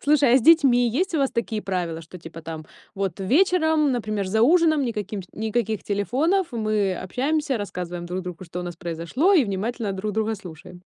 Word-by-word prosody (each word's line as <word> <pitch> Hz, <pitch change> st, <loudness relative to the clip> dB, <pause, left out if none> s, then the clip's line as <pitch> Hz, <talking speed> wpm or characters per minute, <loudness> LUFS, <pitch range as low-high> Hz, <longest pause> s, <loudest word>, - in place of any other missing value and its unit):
Слушай, 285 Hz, -4 st, +4 dB
а -, -, +7 dB
с 245 Hz, -, -4 dB
детьми 270 Hz, -7 st, +5 dB
есть 335 Hz, -, -1 dB
у -, -, +2 dB
вас 275 Hz, -2 st, +1 dB
такие 230 Hz, -2 st, -2 dB
правила, 175 Hz, -4 st, -3 dB
что 165 Hz, +3 st, -11 dB
типа 165 Hz, 0 st, -10 dB
там 160 Hz, -1 st, -7 dB, 0.3 s
вот 195 Hz, -2 st, -3 dB
вечером, 315 Hz, -, +3 dB
например, 215 Hz, -4 st, -2 dB
за 220 Hz, +4 st, +1 dB
ужином 315 Hz, 0 st, +4 dB
никаким 210 Hz, -3 st, -4 dB
ш 180 Hz, -, -17 dB
никаких 220 Hz, 0 st, -2 dB
телефонов, 280 Hz, -, 0 dB
мы 215 Hz, -4 st, 0 dB
общаемся, 270 Hz, -, -1 dB
рассказываем 180 Hz, -3 st, -5 dB
друг 180 Hz, +2 st, -4 dB
другу, 180 Hz, 0 st, -7 dB
что 175 Hz, +1 st, -6 dB
у -, -, -4 dB
нас 175 Hz, -1 st, -6 dB
произошло, 170 Hz, -, 0 dB
и 330 Hz, -9 st, +5 dB
внимательно 205 Hz, +1 st, -3 dB
друг 205 Hz, +2 st, -3 dB
друга 220 Hz, +1 st, 0 dB
слушаем? 180 Hz, -5 st, -11 dB
215 Hz, 195 wpm, -24 LUFS, 185-275 Hz, 0.3 s, а